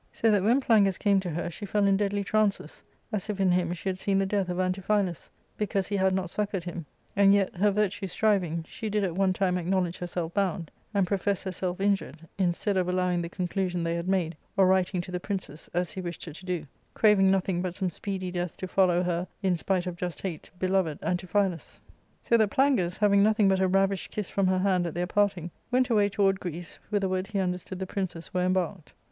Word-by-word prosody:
So 225 - +2
that 205 -2 +3
when 235 +7 +3
Plangus 205 -7 +4
came 200 -2 +3
to 185 -2 -4
her 170 +1 -3
she 205 +4 -7
fell 205 +1 +2
in 195 0 +4
deadly 200 0 0
trances, 215 -1 0 0.3
as 210 -1 -3
if 205 -2 -3
in 190 -2 +3
him 175 -1 +1
she 175 +2 -5
had 185 -1 -1
seen 195 0 +1
the 195 - +2
death 195 -1 0
of 180 0 -2
Antiphilus, 185 -1 0 0.3
because 200 -2 -1
he 205 - -2
had 190 -1 +3
not 190 -2 -2
succoured 200 -4 -2
him; 170 -3 -6 0.3
and 200 0 +6
yet, 195 -2 +1
her 205 +4 +3
virtue 205 -1 0
striving, 180 -5 +1
she 220 - -5
did 210 0 0
at 180 -3 -1
one 190 0 +2
time 185 -1 +1
acknow 185 +2 +1
ledge 175 0 -5
herself 175 -1 -4
bound, 180 -5 -1 0.2
and 200 -3 +2
profess 200 +1 -1
herself 185 -1 -3
injured, 170 -6 -1
instead 190 +2 +1
of 180 -1 +1
allowing 180 -1 +1
the 170 - -4
conclusion 180 -1 -2
they 165 0 0
had 170 +1 -3
made, 180 -4 0 0.2
or 195 - +6
writing 185 -1 +2
to 180 - -9
the 180 - -2
princes, 185 -6 -5
as 175 0 -1
he 190 - -5
wished 175 -1 -6
her 160 - -8
to 185 - -12
do, 175 -4 -2 0.3
craving 210 -3 +5
nothing 190 -2 +1
but 180 -1 -3
some 185 -2 -1
speedy 185 +1 -4
death 175 -1 -3
to 185 - -5
follow 180 -2 +3
her, 175 0 -1 0.2
in 185 -2 +2
spite 185 +1 -1
of 180 -1 -4
just 175 -1 -4
hate, 175 -6 -5
beloved 185 -5 +1
Antiphilus. 180 -1 -1 0.2
" - - -39
So 235 - +4
that 220 -2 +3
Plangus, 215 -10 +2
having 200 -1 +4
nothing 215 0 +4
but 190 -1 +3
a 190 - +3
ravished 195 +1 +1
kiss 210 -2 -4
from 195 -1 +1
her 185 0 +2
hand 185 -2 +2
at 160 - -6
their 175 +1 0
parting, 185 -3 0 0.2
went 250 0 +2
away 205 -2 +4
toward 195 -1 +2
Greece, 175 -1 -6
whither 205 -2 +1
ward 185 +1 -1
he 210 - -4
understood 180 0 -2
the 190 - -3
princes 185 -3 -4
were 180 - +1
embarked. 185 -2 -1
185 Hz, 225 wpm, -27 LUFS, 180-200 Hz, 0.3 s, and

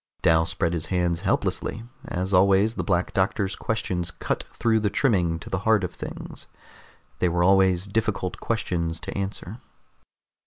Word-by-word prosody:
Dal 80 0 +4
spread 85 0 0
his 85 -1 -3
hands 90 -2 0
helplessly. 105 +2 -1 0.2
As 95 +2 -2
always, 100 +3 +4
the - - -3
Black 90 -2 0
Doctor's 95 +1 0
questions 90 -6 -2
cut - - -3
through 115 -1 +1
the 105 -1 +1
trimming 90 -10 +1
to 80 - -12
the 95 - 0
heart 110 0 +3
of 90 -1 -3
things. - - -8 0.7
They 90 - +2
were 85 +1 +1
always 95 -1 +4
difficult 100 -3 -2
questions 85 -7 -2
to - - -6
answer. 100 +2 -5
95 Hz, 155 wpm, -25 LUFS, 85-105 Hz, 0.7 s, Dal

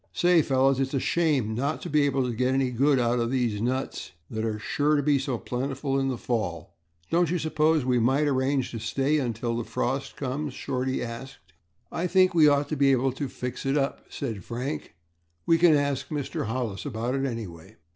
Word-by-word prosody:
"Say, 175 -1 +4
fellows, 135 -1 +2
its 135 +1 -1
a - - +2
shame 145 -9 +1
not 140 +7 -1
to - - -4
be 150 0 +4
able 135 -1 +1
to 125 -1 -2
get 125 +3 +1
any 135 -2 +1
good 135 +3 +3
out 120 0 +1
of 115 0 0
these 120 -5 0
nuts 130 +3 -3 0.2
that 110 0 -3
are 110 -1 -1
sure 150 +7 +1
to 145 - +1
be 145 -1 +3
so 130 -2 -2
plentiful 135 +3 -2
in 135 - 0
the 130 -2 -1
fall. 95 -9 -3 0.4
Don't 170 -1 +3
you 180 - +1
suppose 155 -2 +1
we 125 -1 +2
might 135 +6 +2
arrange 135 -1 +1
to 115 - -5
stay 135 +7 0
until 120 -2 -2
the 120 - -2
frost 125 +4 -2
comes?" 135 +1 -3
Shorty 130 0 -2
asked. 115 -7 -9 0.4
"I 170 - -2
should 180 - -3
think 185 -1 +5
we 160 -3 +6
ought 145 0 +3
to 155 - -1
be 140 -1 +4
able 130 0 +2
to 135 +1 -4
fix 125 0 -5
it 135 +2 +1
up," 140 -1 -2
said 110 -9 -5
Frank. 125 - -5 0.5
"We 165 0 +4
can 170 -2 +6
ask 140 -1 0
Mr. 145 -7 -3
Hollis 115 -4 -3
about 120 -2 -3
it 135 0 -1
anyway." 100 -5 -7
135 Hz, 210 wpm, -26 LUFS, 120-145 Hz, 0.5 s, we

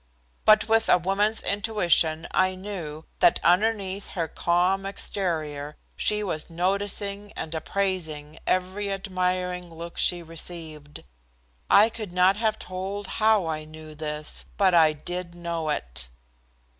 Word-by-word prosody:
But 215 0 +6
with 225 0 +3
a - - +7
woman's 200 +5 +1
intuition 175 -6 +1
I 185 0 +2
knew 175 -6 -6
that - - +5
underneath 195 +1 +2
her 165 -3 -1
calm 180 +4 +1
exterior 155 -7 -2 0.2
she 210 0 +1
was 155 -6 -3
noticing 200 +3 -1
and 160 - -5
appraising 160 -3 -2
every 190 +2 0
admiring 180 -2 -2
look 170 +1 -8
she 175 -1 +2
received. 160 -2 -7 0.7
I 210 +3 +7
could 215 -5 -7
not 185 +2 +5
have 220 -1 +1
told 190 +3 -5 0.2
how 215 -4 +4
I 155 -1 -2
knew 155 0 -11
this, 150 0 -2
but 190 -2 +4
I 160 -2 +6
did 175 +3 -6
know 170 -2 -3
it. - - -3
180 Hz, 130 wpm, -26 LUFS, 160-200 Hz, 0.7 s, a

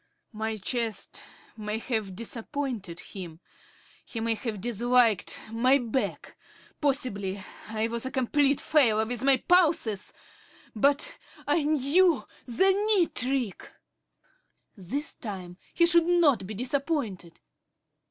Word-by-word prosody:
My 220 0 -3
chest 225 +1 -3 0.3
may 210 0 -3
have 220 -5 -3
disappointed 230 - -5
him.... 175 -5 -9 0.6
He 230 - -6
may 225 0 +1
have 220 -2 -4
disliked 240 0 +2
my 250 +4 +4
back.... 250 0 -3 0.5
Possibly 200 -9 0 0.2
I 220 +1 -1
was 235 +2 -4
a - - -2
complete 275 +2 +2
failure 225 -8 +3
with 245 +1 -3
my 270 -1 +5
pulses.... 315 - +2 0.6
But 280 +7 +1 0.3
I 335 - +3
knew 310 +3 +3 0.2
the 380 +11 +4
knee 405 -3 +2
trick. 250 -5 -2 1.0
This 245 - -3
time 185 -5 -7 0.2
he 340 - +5
should 340 -1 +4
not 295 - +3
be 215 - -6
disappointed. 250 - -3
240 Hz, 115 wpm, -27 LUFS, 215-285 Hz, 1.0 s, my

